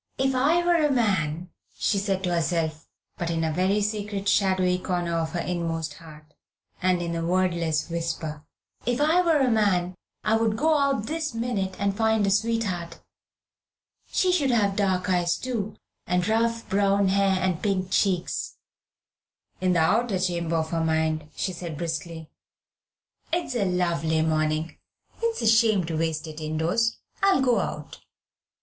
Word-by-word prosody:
"If 265 Hz, 0 st, +1 dB
I 310 Hz, +7 st, +2 dB
were 345 Hz, -2 st, +3 dB
a 295 Hz, -, +3 dB
man," 180 Hz, -, 0 dB, 0.3 s
she 200 Hz, -, +1 dB
said 195 Hz, -1 st, -1 dB
to 180 Hz, -2 st, 0 dB
herself, 160 Hz, -1 st, -1 dB, 0.3 s
but 170 Hz, -, -2 dB
in 165 Hz, -1 st, -1 dB
a 160 Hz, -1 st, 0 dB
very 190 Hz, +5 st, +1 dB
secret 205 Hz, -1 st, -3 dB
shadowy 185 Hz, -2 st, +2 dB
corner 175 Hz, -2 st, -2 dB
of 160 Hz, -1 st, -3 dB
her 175 Hz, -, -1 dB
inmost 165 Hz, -3 st, -3 dB
heart, 155 Hz, -2 st, -14 dB, 0.5 s
and 180 Hz, -1 st, +2 dB
in 170 Hz, 0 st, -3 dB
a 165 Hz, -, -2 dB
wordless 170 Hz, -3 st, 0 dB
whisper, 165 Hz, -3 st, -4 dB, 0.4 s
"if 245 Hz, 0 st, +1 dB
I 315 Hz, +5 st, +4 dB
were 335 Hz, -3 st, +3 dB
a 265 Hz, -3 st, +2 dB
man, 190 Hz, -5 st, +2 dB, 0.3 s
I 220 Hz, +1 st, +3 dB
would 225 Hz, -1 st, 0 dB
go 315 Hz, +4 st, +3 dB
out 275 Hz, -6 st, +1 dB
this 305 Hz, -1 st, -3 dB
minute 215 Hz, -5 st, -2 dB
and 200 Hz, 0 st, 0 dB
find 220 Hz, -1 st, +2 dB
a 195 Hz, -, +1 dB
sweetheart. 205 Hz, -6 st, -1 dB, 1.1 s
She 370 Hz, -, +2 dB
should 300 Hz, -7 st, +2 dB
have 205 Hz, -5 st, +2 dB
dark 190 Hz, -3 st, 0 dB
eyes, 175 Hz, -2 st, +1 dB
too, 230 Hz, -5 st, -3 dB, 0.3 s
and 180 Hz, +1 st, +1 dB
rough 230 Hz, +1 st, 0 dB
brown 200 Hz, 0 st, +2 dB
hair, 195 Hz, 0 st, +2 dB
and 185 Hz, -2 st, -1 dB
pink 190 Hz, -3 st, -1 dB
cheeks." 185 Hz, -4 st, 0 dB, 1.0 s
In 185 Hz, -1 st, +2 dB
the 170 Hz, -, +3 dB
outer 215 Hz, +5 st, +2 dB
chamber 170 Hz, -2 st, -1 dB
of 160 Hz, -1 st, -1 dB
her 165 Hz, -1 st, 0 dB
mind 160 Hz, -1 st, 0 dB
she 185 Hz, -, -2 dB
said 170 Hz, -3 st, -6 dB
briskly 165 Hz, 0 st, -4 dB, 1.0 s
"It's 345 Hz, -5 st, -1 dB
a 230 Hz, -5 st, 0 dB
lovely 170 Hz, -3 st, +1 dB
morning. 155 Hz, 0 st, -1 dB, 0.4 s
It's 460 Hz, -, -1 dB
a -, -, +2 dB
shame 220 Hz, -3 st, +4 dB
to 165 Hz, 0 st, -3 dB
waste 160 Hz, -1 st, -1 dB
it 155 Hz, 0 st, -8 dB
indoors. 160 Hz, +9 st, 0 dB, 0.2 s
I'll 390 Hz, -9 st, +4 dB
go 245 Hz, -5 st, +3 dB
out." 150 Hz, -5 st, -5 dB
185 Hz, 160 wpm, -25 LUFS, 165-225 Hz, 1.1 s, I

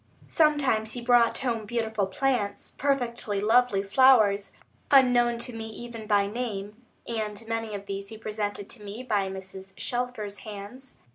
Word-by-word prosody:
Sometimes, 275 Hz, -9 st, +2 dB
he 245 Hz, -, -5 dB
brought 240 Hz, -1 st, +4 dB
home 230 Hz, -5 st, -2 dB
beautiful 220 Hz, -3 st, -1 dB
plants, 255 Hz, -5 st, -1 dB
perfectly 245 Hz, -7 st, 0 dB
lovely 220 Hz, -1 st, +3 dB
flowers, 205 Hz, -3 st, +4 dB, 0.4 s
unknown 245 Hz, -3 st, +5 dB
to 235 Hz, 0 st, -5 dB
me 225 Hz, 0 st, -5 dB
even 230 Hz, -1 st, -8 dB
by 205 Hz, -2 st, +3 dB
name, 210 Hz, 0 st, -5 dB, 0.2 s
and 215 Hz, -2 st, -3 dB
many 225 Hz, -2 st, -2 dB
of 200 Hz, 0 st, -7 dB
these 200 Hz, 0 st, -5 dB
he 220 Hz, -, -8 dB
presented 210 Hz, -2 st, -4 dB
to 215 Hz, -, -9 dB
me 205 Hz, +5 st, -7 dB
by 205 Hz, -6 st, 0 dB
Mrs. 190 Hz, 0 st, -9 dB
Shelfer's 240 Hz, -5 st, -3 dB
hands. 215 Hz, +5 st, -10 dB
220 Hz, 145 wpm, -27 LUFS, 205-245 Hz, 0.4 s, unknown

